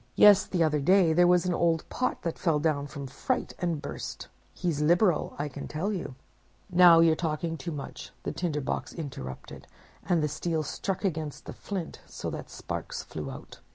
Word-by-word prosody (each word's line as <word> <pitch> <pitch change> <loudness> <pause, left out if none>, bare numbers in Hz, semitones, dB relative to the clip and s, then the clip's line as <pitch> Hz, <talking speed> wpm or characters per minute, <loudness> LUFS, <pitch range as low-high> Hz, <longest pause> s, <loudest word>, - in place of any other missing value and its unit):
Yes, 205 -2 +7
the 175 -3 +1
other 150 -2 +2
day 180 +2 +4
there 175 +2 +5
was 180 0 +4
an 180 - +1
old 165 -2 +1
pot 255 - -2
that 165 - -3
fell 165 -4 +2
down, 145 -2 0
from 140 -1 -7
fright, 135 0 -2
and 170 -4 -1
burst. 140 - -6 0.2
He's 170 -5 -2
liberal, 175 +2 +3
I 145 - -2
can 140 - -7
tell 185 +8 -2
you!'—'Now 175 +2 +2
you're 165 -1 +5
talking 165 0 -2
too 160 +2 -5
much,' 145 -3 -7
the - - -2
Tinder 160 -5 -2
box - - -3
interrupted, 130 - -7 0.4
and 170 -4 +1
the - - +2
steel 160 +2 -2
struck 195 +6 -3
against 155 -5 -3
the - - -7
flint, 190 -5 -6
so - - -5
that - - -7
sparks - - -5
flew - - -6
out. - - -10
165 Hz, 185 wpm, -28 LUFS, 150-180 Hz, 0.4 s, Yes